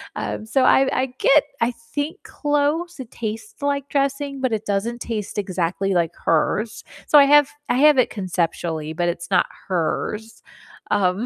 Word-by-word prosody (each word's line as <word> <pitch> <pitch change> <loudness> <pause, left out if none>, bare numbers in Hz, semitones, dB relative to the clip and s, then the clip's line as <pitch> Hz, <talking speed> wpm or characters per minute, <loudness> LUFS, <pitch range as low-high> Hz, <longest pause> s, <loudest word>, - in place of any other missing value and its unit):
Um, 215 - -4
so 255 +4 +2
I 265 +1 +5
I 265 - 0
get, 295 +1 +5 0.2
I 230 +2 +2 0.2
think, 290 +2 -3
close, 295 +3 -1
it 240 - -11
tastes 230 - -6
like 280 -1 -1
dressing, 275 0 -1
but 255 -3 0
it 220 0 -2
doesn't 210 +4 -1
taste 215 -3 -4
exactly 190 0 -1
like 170 -3 +1
hers. 205 +7 0 0.2
So 295 - +7
I 280 - +7
have 290 0 +6 0.2
I - - +2
have 300 0 +6
it 255 - +3
conceptually, 170 -5 -2
but 175 +1 0
it's 170 0 -5
not 180 - +4 0.2
hers, 210 +5 -2 0.5
um 195 +2 +1
225 Hz, 165 wpm, -22 LUFS, 185-280 Hz, 0.5 s, So